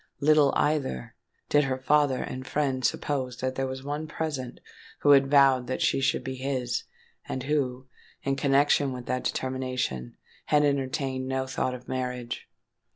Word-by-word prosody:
Little, 150 -1 +5
either, 145 - 0 0.3
did 145 -1 +3
her 130 -1 -1
father 140 0 +2
and 130 +1 -6
friend 135 -3 0
suppose 130 -2 -1
that 130 0 -2
there 135 0 -1
was 130 0 -6
one 145 +2 -3
present 145 -6 -4 0.4
who 145 - +5
had 135 -1 +6
vowed 135 -3 +5
that 130 - -2
she - - +2
should 135 - +1
be 130 - -4
his, 130 -2 -2 0.4
and 130 - -3
who, 130 -3 -1 0.4
in 135 0 0
connection 140 0 +3
with 125 -1 -7
that 125 - -2
determination, 130 - -2 0.3
had 150 0 +3
entertained 135 -1 -1
no 130 0 -1
thought 130 -1 -2
of 125 - -12
marriage. 125 -2 -4
130 Hz, 160 wpm, -27 LUFS, 130-140 Hz, 0.4 s, had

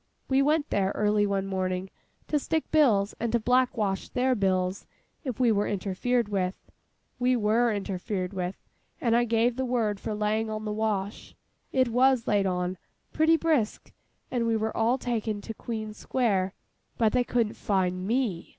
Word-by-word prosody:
We 265 0 +3
went 300 +1 +1
there, 195 -1 +1
early 210 0 +2
one 195 -1 -1
morning, 185 -1 -2 0.4
to 300 - +1
stick 320 +2 -2
bills 225 -10 +4
and 235 0 -1
to 235 - +3
black 250 +2 +2
wash 195 -3 -1
their 255 +1 +1
bills 190 -3 0 0.4
if 255 -6 -4
we 245 -3 +4
were 205 -1 +1
interfered 205 +5 0
with. 190 -2 -1 0.6
We 250 +1 +3
were 230 +1 +2
interfered 195 -1 -3
with, 185 0 -3 0.4
and 230 -2 +2
I 240 0 +3
gave 230 +1 +1
the 260 - 0
word 230 -5 0
for 215 - -4
laying 215 +1 0
on 215 0 -4
the 210 - -2
wash. 210 -2 -2 0.4
It 260 -2 +2
was 250 0 +3
laid 200 -2 +2
on—pretty 185 - 0
brisk—and 250 -4 -2
we 225 -1 +2
were 220 0 -2
all 230 +3 +2
taken 225 -4 -2
to 225 - -6
Queen 215 -1 -5
Square: 200 -5 0 0.4
but 220 -2 +3
they 250 - +3
couldn't 235 -3 0
fine 185 -2 -1
me. 225 -7 -1
220 Hz, 165 wpm, -27 LUFS, 195-245 Hz, 0.6 s, bills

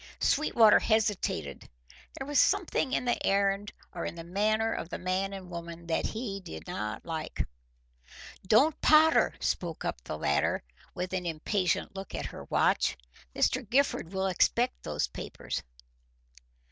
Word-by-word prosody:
Sweetwater 235 -7 +5
hesitated. 200 - 0 0.5
There 270 - -4
was 290 0 +2
something 360 -8 +2
in 250 - 0
the 240 - 0
errand 200 +1 +1 0.2
or 170 - -4
in - - -4
the 165 - -7
manner 215 +5 +1
of 165 - -5
the - - -4
man 185 +2 -1
and 190 -2 -8
woman 170 0 -7
that 165 -1 0
he 215 -3 -4
did 80 - -9
not 105 +1 -4
like. 160 -2 -3 1.0
"Don't 270 +10 +4
potter!" 315 +1 +5
spoke 170 -3 -2
up - - -3
the 75 - -5
latter, 70 -2 +1 0.3
with 180 +1 -4
an 180 -2 -2
impatient 180 +4 -1
look 195 0 -7
at - - -3
her - - -8
watch. - - +2 0.4
"Mr. 260 - +2
Gifford 260 -9 +1
will 190 0 -1
expect 170 - +1
those - - -1
papers." - - -5
195 Hz, 145 wpm, -29 LUFS, 170-220 Hz, 1.0 s, Sweetwater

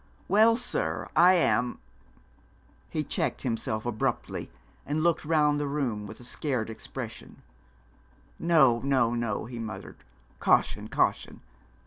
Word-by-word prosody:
'Well, 220 +4 +5
sir. 80 - -2
I 180 +2 +7
am 125 -8 +1 0.6
' - - -33 0.3
He 155 - -2
checked 145 - -2
himself 115 -3 -2
abruptly, 115 -3 -2 0.3
and 155 +2 -1
looked 170 -1 +2
round 150 -2 +2
the 145 - -1
room 125 -8 -2
with 110 - -10
a - - -10
scared 125 -3 -2
expression. 110 - -8 1.0
'No, 135 -9 +4
no, 130 -3 +2
no,' 115 -4 -2
he 120 0 -7
muttered; 110 -1 -7 0.4
'caution, - - +2
caution! - - 0
130 Hz, 125 wpm, -28 LUFS, 115-155 Hz, 1.0 s, I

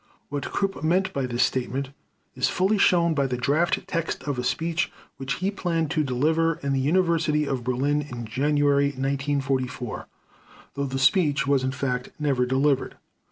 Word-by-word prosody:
What 145 0 -4
Krupp 195 -4 -2
meant 180 +4 +1
by 135 -2 -1
this 120 0 +1
statement 130 +1 -1 0.4
is - - +1
fully 195 +3 +1
shown 170 -3 +4
by 140 -3 +1
the 125 -1 -2
draft 145 +7 +1
text 165 -1 -2
of 140 -4 -2
a - - -2
speech 165 +7 -1 0.3
which 135 0 -3
he 190 +8 -1
planned 165 -6 -1
to 155 -2 +1
deliver 160 +5 +1
in 140 0 0
the 135 - +1
University 160 0 +2
of 135 -3 -2
Berlin 135 +4 +1
in 125 -5 -7
January 140 +4 +2
1944, 135 -3 -2 0.7
though 140 - -2
the 135 -1 -3
speech 140 -1 +3
was 140 -2 +2
in 130 - 0
fact 125 -2 -2
never 135 -5 +1
delivered. 135 +2 +1
140 Hz, 165 wpm, -25 LUFS, 130-160 Hz, 0.7 s, shown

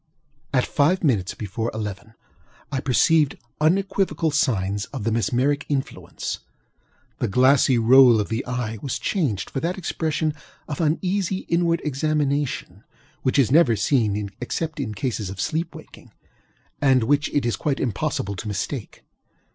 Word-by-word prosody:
At 130 -2 +2
five 165 +6 +2
minutes 105 - +1
before 110 +2 -3
eleven 105 +1 -6 0.6
I 135 - -1
perceived 145 +3 +3 0.2
unequivocal 175 -1 +1
signs 100 -9 0
of - - -7
the 115 - 0
mesmeric 130 +5 +1
influence. 140 -2 -3 0.8
The - - 0
glassy 130 +3 +4
roll 120 0 +7
of 105 - -1
the 115 +3 -2
eye 120 -3 -3
was 135 - -2
changed 130 - -1
for - - -2
that 170 +6 -2
expression 160 -3 -1 0.3
of 150 +2 -4
uneasy 185 +4 0
inward 170 0 +2
examination 145 -1 -1 0.4
which 130 - +1
is 130 -5 +3
never 145 -6 +5
seen 105 -3 0
except 155 +5 -3
in 110 -6 -3
cases 105 -3 -2
of 95 0 -8
sleep 160 - -2
waking, - - -13 0.7
and 130 -4 +4
which 145 +5 +2
it 145 - 0
is 120 - +1
quite 145 -3 -1
impossible 100 -3 -2
to 110 - -6
mistake. 105 +4 -4
135 Hz, 140 wpm, -23 LUFS, 110-155 Hz, 0.8 s, roll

